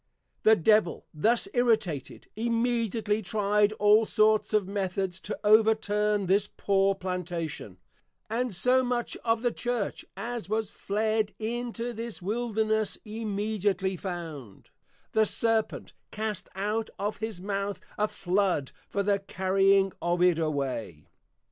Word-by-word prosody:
The 220 0 +6
Devil 210 -1 +2
thus 225 +10 +2
Irritated, 220 - 0
immediately 230 -2 0
try'd 205 +1 +2
all 210 +1 +5
sorts 215 0 +3
of 210 -3 +2
Methods 190 -2 -2
to - - -5
overturn 210 -1 +3
this 195 +3 +2
poor 195 -1 +1
Plantation: 175 - -4 0.5
and 240 +2 -1
so 250 +8 +4
much 245 -1 -1
of 225 0 0
the 240 - +2
Church, 240 -4 -3
as 235 -5 -4
was 220 -1 -1
Fled 215 +1 -1
into 240 +1 -3
this 230 0 -6
Wilderness, 220 +1 0
immediately 205 -3 -1
found, 165 - -7 0.4
_The 220 -1 +4
Serpent 225 0 0 0.2
cast 215 -2 -4
out 210 +3 -1
of 205 +2 -2
his 220 -4 -4
Mouth 200 +1 -3 0.2
a 210 - +1
Flood 180 -8 0 0.2
for 200 - -1
the 200 0 +2
carrying 195 0 +2
of 175 +1 +1
it 180 -2 +4
away. 135 - -3
210 Hz, 125 wpm, -28 LUFS, 190-220 Hz, 0.5 s, The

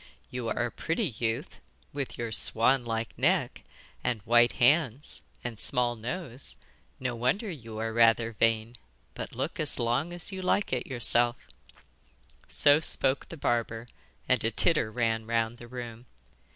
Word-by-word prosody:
'You 125 -2 -4
are 120 +2 0
a 120 - -4
pretty 165 +3 -2
youth, 115 +6 -3 0.3
with 140 -2 -4
your 115 -1 -4
swan 125 +4 +4
like 115 0 -3
neck - - +1 0.4
and 120 -3 0
white 120 +2 +4
hands 140 0 +2 0.2
and 120 -3 -5
small 125 -2 +3
nose. 125 - -5 0.4
No 125 -2 -2
wonder 130 - 0
you 115 -8 -9
are 110 0 -3
rather 115 0 +4
vain; 115 +1 0 0.4
but - - -7
look - - -3
as - - +4
long 120 +8 0
as 175 +2 -3
you 190 -1 -5
like 185 -1 0
at 125 - -2
yourself.' 120 -1 +2 1.0
So 145 +1 +4
spoke 135 -4 0
the 165 - -8
barber, 115 -3 -1 0.4
and 125 -3 +3
a 115 - +2
titter 140 -2 +2
ran 115 -1 -1
round 115 0 -1
the 120 - -10
room. 120 -1 -8
120 Hz, 150 wpm, -28 LUFS, 115-135 Hz, 1.0 s, swan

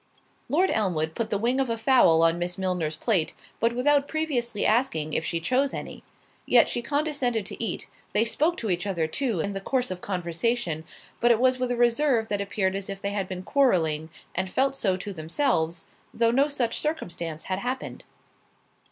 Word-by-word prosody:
Lord 360 +6 +3
Elmwood 160 -7 0
put 225 +3 -3
the 210 - 0
wing 240 +5 +1
of 265 -2 +1
a 230 - -1
fowl 225 -9 +5
on 165 +1 +3
Miss 175 0 -2
Milner's 180 -5 -1
plate, 175 -1 0 0.2
but 230 +1 +1
without 285 +3 +3
previously 250 -9 -1
asking 210 - +1
if - - +1
she 165 0 -1
chose 255 +11 +1
any; - - -7 0.5
yet - - +6
she 240 - -2
condescended 280 -6 0
to 230 - -5
eat—they 220 0 -2
spoke 315 +8 +1
to 220 -4 -2
each 180 +3 -1
other 170 -5 0
too 220 - -1
in 200 +5 -2
the 195 - -4
course 250 +1 -1
of 180 -1 -5
conversation, 175 -1 -1 0.3
but 240 - +3
it 235 -2 +4
was 255 0 +3
with 255 -1 -1
a 245 - 0
reserve 240 -1 +2
that 205 -1 -1
appeared 195 -1 -1
as 195 0 -4
if 195 0 -5
they 200 0 -2
had 200 -2 -2
been 185 -1 -6
quarrelling, 165 - +2 0.2
and 185 +1 -2
felt 270 +6 +1
so 190 -8 0
to 200 +2 -6
themselves, 165 - 0 0.3
though 230 0 +2
no 275 +4 +3
such 255 -6 0
circumstance 170 - -3
had 185 0 -2
happened. 255 +4 -4
215 Hz, 190 wpm, -26 LUFS, 180-255 Hz, 0.5 s, yet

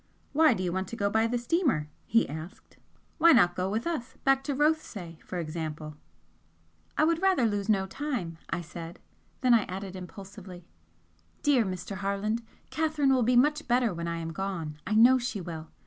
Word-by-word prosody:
"Why 310 -4 +5
do 185 - -3
you 175 -1 -1
want 190 0 -2
to 230 - -6
go 200 -2 0
by 220 +2 +3
the 245 +1 0
steamer?" 240 - +1 0.2
he 230 +1 +3
asked 160 +8 -9 0.4
"Why 335 +1 +7
not 175 -8 +5
go 185 +1 -1
with 220 +3 -2
us 305 -8 -3
back 270 0 +3
to 285 - -1
Rothesay, 250 - -1
for 185 - -6
example?" 155 -2 -5 1.0
"I - - +4
would 330 +1 +2
rather 375 -10 +3
lose 205 -1 -1
no 195 -3 +3
time," 190 - -4
I 165 - -2
said 170 0 -9 0.4
then 250 -2 +5
I 230 - +6
added 190 +1 -6
impulsively: 185 -1 -10 0.8
"Dear 280 -5 +4
Mr. 190 +1 -5
Harland, 200 +4 -1 0.3
Catherine 305 -3 +2
will 255 - +3
be 245 +2 +3
much 300 +5 +3
better 240 -3 +2
when 170 0 -4
I 170 0 -2
am 165 0 -5
gone 165 -5 -4
I 215 - 0
know 245 +4 +7
she 240 -4 -3
will! 165 -3 -7
205 Hz, 185 wpm, -28 LUFS, 175-255 Hz, 1.0 s, Why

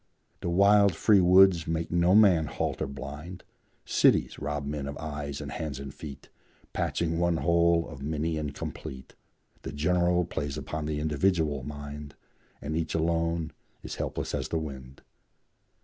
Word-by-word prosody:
The - - -3
wild, 100 +2 +5
free 105 -3 +5
woods 90 -2 +6
make 80 0 -2
no 85 +2 +4
man 95 -8 +5
halt - - -3
or - - 0
blind; 75 +7 -8 0.4
Cities - - +3
rob 75 0 -3
men 70 -1 -4
of 70 - -5
eyes 70 -3 -5
and 75 -1 -6
hands 75 -4 -4
and 70 0 -7
feet, 70 -3 -10 0.4
Patching 85 -1 -1
one 85 -1 +2
whole 85 0 +3
of 80 -5 -10
many 80 +3 -1
incomplete; 70 -3 -6 0.5
The - - -6
general 90 +3 +2
preys 75 -3 -4
upon 75 0 -4
the 75 -1 -2
individual 80 -1 +1
mind, 75 +1 -8 0.5
And 75 +2 -3
each 80 0 -2
alone 85 0 0 0.3
is - - -6
helpless - - -3
as - - -2
the 80 - -1
wind. 70 -4 -7
80 Hz, 150 wpm, -28 LUFS, 75-85 Hz, 0.5 s, woods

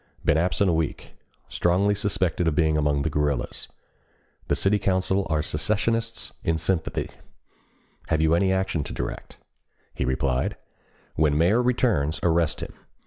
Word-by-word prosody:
Been - - +4
absent 90 +4 +2
a 90 - +3
week. 80 -2 -2 0.4
Strongly 95 +4 +2
suspected 95 -4 0
of 80 - +1
being 80 -1 +2
among 75 -2 +1
the 80 - 0
guerrillas. 75 -3 -1 0.8
The - - +1
city 105 +1 +2
council 95 0 0
are 75 -1 +1
secessionists 115 +8 -1
in 80 0 +1
sympathy. 80 +1 -2 1.0
Have 80 - +1
you 80 +1 +3
any 95 +3 +3
action 95 -5 0
to - - -6
direct?" - - -6 0.6
He - - -3
replied: 65 0 0 0.6
"When 75 -1 +2
mayor 95 +9 +4
returns 115 - +1
arrest 85 -2 +2
him. - - -6
85 Hz, 140 wpm, -25 LUFS, 75-95 Hz, 1.0 s, Been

